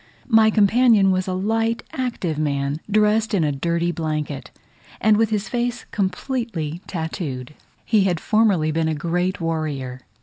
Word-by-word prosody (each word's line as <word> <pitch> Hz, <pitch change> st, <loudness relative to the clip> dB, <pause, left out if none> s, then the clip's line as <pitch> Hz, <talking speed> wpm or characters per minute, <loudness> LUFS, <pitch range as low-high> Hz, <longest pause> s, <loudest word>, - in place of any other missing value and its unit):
My 220 Hz, -2 st, +6 dB
companion 215 Hz, -1 st, +4 dB
was 185 Hz, 0 st, 0 dB
a 185 Hz, -, -1 dB
light 225 Hz, +4 st, 0 dB
active 215 Hz, -, -2 dB
man, 140 Hz, -1 st, -1 dB
dressed 215 Hz, +1 st, +2 dB
in 175 Hz, -, +2 dB
a 150 Hz, -, +1 dB
dirty 170 Hz, +4 st, 0 dB
blanket, 155 Hz, -4 st, -3 dB, 0.5 s
and 215 Hz, 0 st, +4 dB
with 220 Hz, 0 st, +2 dB
his 210 Hz, -1 st, -1 dB
face 245 Hz, 0 st, -2 dB
completely 190 Hz, -, -2 dB
tattooed. 160 Hz, -6 st, -4 dB, 0.3 s
He 210 Hz, -4 st, +3 dB
had 175 Hz, -4 st, +1 dB
formerly 200 Hz, -8 st, +2 dB
been 160 Hz, +1 st, 0 dB
a 160 Hz, -, 0 dB
great 175 Hz, +4 st, -1 dB
warrior. 150 Hz, -6 st, -3 dB
185 Hz, 145 wpm, -22 LUFS, 155-220 Hz, 0.5 s, My